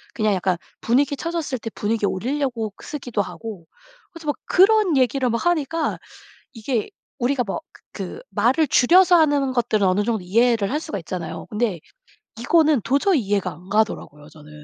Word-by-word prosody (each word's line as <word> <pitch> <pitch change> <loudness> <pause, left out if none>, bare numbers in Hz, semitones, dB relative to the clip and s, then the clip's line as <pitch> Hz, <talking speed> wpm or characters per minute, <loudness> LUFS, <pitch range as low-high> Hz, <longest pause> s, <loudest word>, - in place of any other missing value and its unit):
그냥 215 -2 +1
약간 185 -1 0 0.2
분위기 280 +4 +2
처졌을 330 -4 -3
때 225 - -5
분위기 210 0 -1
올리려고 240 -1 -2
쓰기도 245 -8 -3
하고 200 -3 -8 0.5
그래서 335 -4 -11
막 290 - +1
그런 390 -4 +4
얘기를 255 0 +2
막 230 +8 -2
하니까 330 -1 0 0.5
이게 225 -1 -2 0.3
우리가 250 0 +1
뭐 195 - -4
그 - - -24
그 - - -6
말을 255 +9 +2
줄여서 355 +7 +5
하는 285 -4 +2
것들은 215 -5 +1
어느 195 +3 +2
정도 220 -3 -1
이해를 225 +1 +2
할 300 +3 -1
수가 300 - -5
있잖아요. 165 -1 -6
근데 210 -5 -1 0.6
이거는 305 0 +3
도저히 285 +3 +2
이해가 200 -2 -1
안 180 +5 -15
가더라고요 175 -9 -1
저는. 150 0 -15
240 Hz, 355 characters per minute, -22 LUFS, 205-290 Hz, 0.6 s, 줄여서